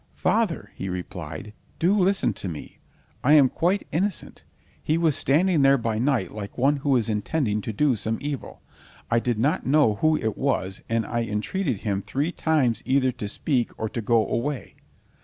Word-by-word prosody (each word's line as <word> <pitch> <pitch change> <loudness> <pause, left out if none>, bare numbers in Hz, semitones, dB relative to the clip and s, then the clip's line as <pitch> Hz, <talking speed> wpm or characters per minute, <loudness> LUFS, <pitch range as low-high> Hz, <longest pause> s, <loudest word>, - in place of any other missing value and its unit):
"Father," 220 -7 0
he 95 - -5
replied, 90 +3 -6 0.2
"do 180 +5 +3
listen 195 0 +2
to - - -6
me. 80 -4 -8 0.4
I 145 - +5
am 140 -4 +7
quite 180 +8 0
innocent. 185 +4 -2 0.4
He 155 - +1
was 165 -4 +2
standing 165 +3 +2
there 135 0 +5
by 115 -3 -2
night 125 -7 +1
like 105 -1 -7
one 140 +4 +3
who 140 -1 +1
is 115 -4 +1
intending 105 +1 -1
to 110 - -4
do 130 +4 +2
some 110 +1 -2
evil. 145 -2 -6 0.5
I 115 - +4
did 120 -1 -1
not 145 +9 0
know 135 -7 +4
who 155 +4 +3
it 110 -5 -2
was, 100 -9 -1
and 115 0 +1
I 120 0 -1
entreated 115 - -2
him 100 -2 -1
three 145 - -2
times 150 -10 +1
either 130 -1 +2
to 105 - -6
speak 125 +3 -1
or 110 - -1
to 115 - -4
go 110 +1 +2
away." 135 +3 -3
130 Hz, 180 wpm, -25 LUFS, 110-155 Hz, 0.5 s, am